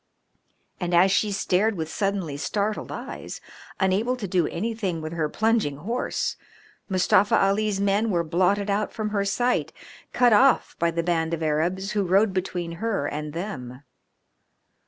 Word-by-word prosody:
And 175 -1 -1
as 185 +3 +5
she 205 +1 +2
stared 200 +2 +1
with 160 -1 -3
suddenly 195 -4 -2
startled 205 +8 -2
eyes, - - -7 0.4
unable 205 +6 +1
to 225 -6 -5
do 180 -3 +1
anything 200 -3 -3
with 155 +1 -6
her 160 -3 -1
plunging 220 -8 +1
horse, 230 - -2 0.5
Mustafa 190 +2 +3
Ali's 200 +1 +1
men 200 +3 +1
were 175 -4 +1
blotted 185 +5 +1
out 205 +1 0
from 215 -1 -3
her 200 -1 0
sight, 245 +5 0 0.4
cut 245 -2 +4
off 260 +5 +4
by 170 - +2
a 170 0 -1
band 165 -1 0
of 165 - -6
Arabs 175 +6 0
who 210 - 0
rode 195 +3 +3
between 180 -2 -3
her 225 -10 -1
and 150 +1 -4
them. 135 -8 -6
190 Hz, 155 wpm, -25 LUFS, 170-210 Hz, 0.5 s, as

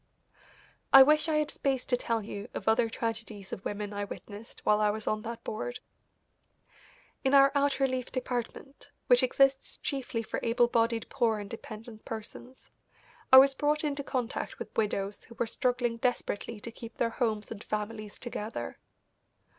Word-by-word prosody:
I 270 0 +11
wish 305 +3 +3
I 310 - +2
had 305 -1 +1
space 265 -2 -1
to 250 - +2
tell 230 -2 -1
you 200 -1 -7
of - - -5
other 225 +1 +4
tragedies 225 -4 -4
of 190 - -6
women 205 0 -4
I 205 0 -2
witnessed 205 +2 -9
while 210 0 +4
I 210 - +4
was 215 +1 -3
on 215 0 0
that 230 +1 -6
board. 245 +3 -4 1.4
In 270 +1 +4
our 275 0 +7
out 285 0 +2
relief 255 -2 0
department, 255 +2 -5 0.2
which 245 -1 +6
exists 270 +1 +2
chiefly 260 -4 -3
for 220 - -3
able 235 +1 +3
bodied 230 -1 +1
poor 235 -5 +1
and 205 -1 -6
dependent 220 0 -9
persons, 230 +3 -9 0.6
I 260 - +11
was 270 +1 +8
brought 295 +2 +1
into 285 -2 -1
contact 255 -3 -3
with - - -8
widows 205 -2 -1
who 235 - -14
were 235 - 0
struggling 245 0 0
desperately 230 -2 -2
to 235 - -6
keep 230 0 -10
their 230 - +1
homes 220 -3 -1
and 215 -2 -7
families 215 0 -4
together. 225 -2 -5
235 Hz, 165 wpm, -30 LUFS, 215-260 Hz, 1.4 s, I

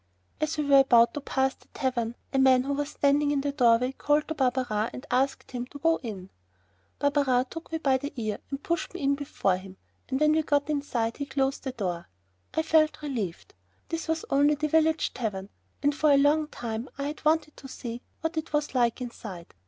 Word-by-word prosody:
As 310 0 -1
we 300 - +1
were 280 -1 +6
about 240 -3 +5
to 290 - -4
pass 265 -1 0
the - - -25
tavern, 240 -4 -1 0.2
a 270 - +2
man 260 -1 +5
who 280 +2 -1
was 290 +1 -2
standing 285 +1 +2
in 285 -1 +1
the 285 0 -1
doorway 250 -2 +3
called 295 +2 +1
to - - 0
Barberin 250 -6 0
and 255 - -8
asked 265 +2 0
him 250 -1 -4
to 285 - -10
go 325 +3 +2
in. 195 -7 -7 0.7
Barberin 280 -3 +2
took 330 0 -8
me 325 - 0
by 270 -4 +2
the 285 +2 -5
ear 215 -4 -3
and 275 0 -5
pushed 340 +1 -2
me 365 - -5
in 280 0 +3
before 275 -9 0
him, 190 0 -11 0.3
and 265 0 0
when 305 0 +4
we 315 +1 +3
got 290 -1 +1
inside 245 -6 -1
he 285 - -4
closed 270 0 -1
the 265 - -1
door. 180 -8 -4 0.5
I 320 - +2
felt 310 -1 +3
relieved. 225 - -4 0.4
This 330 0 -3
was 320 0 -1
only 290 +2 +4
the 305 +1 -1
village 320 0 +2
tavern, 200 -5 -4 0.3
and 290 +1 +3
for 300 0 +3
a 280 - +6
long 295 +2 +3
time 230 -3 -5
I 280 - -3
had 295 +2 -5
wanted 310 0 +2
to 270 - -10
see 240 -2 -6 0.2
what 325 0 -2
it 315 0 -3
was 295 -1 0
like 240 -1 +1
inside. 210 -8 -8
275 Hz, 215 wpm, -27 LUFS, 245-300 Hz, 0.7 s, were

